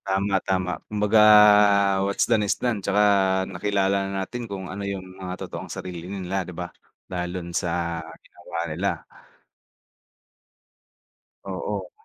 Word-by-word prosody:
Tama, 100 +1 0
tama 95 -1 0 0.2
kumbaga 105 +1 +2 0.9
what's 100 0 +1
done 115 -2 +3
is - - +1
done 120 -5 -1
tsaka 100 +2 +1 0.5
nakilala 100 +1 0
natin 105 +5 -4
kung 95 -1 -5
ano 95 +2 -6
yung 100 -2 -4 0.2
mga 90 -1 -5
totoong - - -8
sarili 90 -1 -7
nila 95 -1 -3
'di 90 -1 -8
ba, 90 -1 -4 0.4
lalo 90 0 -4
na 85 - -9
sa 85 -2 -1 0.2
ginawa 85 - -10
nila. 85 +5 -3 2.4
Oo. 95 -1 -4
95 Hz, 125 wpm, -24 LUFS, 90-100 Hz, 2.4 s, done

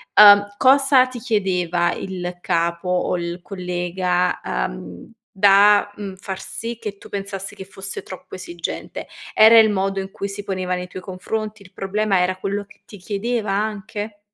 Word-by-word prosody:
ehm, 205 -1 +9
cosa 270 0 +5
ti 255 -1 -8
chiedeva 180 -7 0
il 180 -2 -5
capo 170 0 -1
o 180 0 +1
il 170 +1 -4
collega, 180 -1 -1
ehm, - - -5 0.2
da, 205 +1 +5
mhmm, 195 -2 -7
far 190 0 -6
sì 230 0 -5
che 205 -3 -6
tu - - -14
pensassi 195 -1 -5
che 190 - -9
fosse 195 0 -6
troppo 185 - -10
esigente? 175 -2 -6 0.3
Era 225 +1 +8
il 220 - +6
modo 195 -1 0
in 190 0 -5
cui 200 - -4
si 200 +1 -6
poneva 185 -2 -2
nei 180 0 -5
tuoi 185 - -8
confronti? 215 +3 -5
Il 185 -2 -17
problema 200 0 0
era 185 +1 0
quello 200 +1 -3
che 200 - -21
ti 205 - -12
chiedeva 210 +3 -2
anche? 210 +1 -3
195 Hz, 165 wpm, -21 LUFS, 180-210 Hz, 0.3 s, ehm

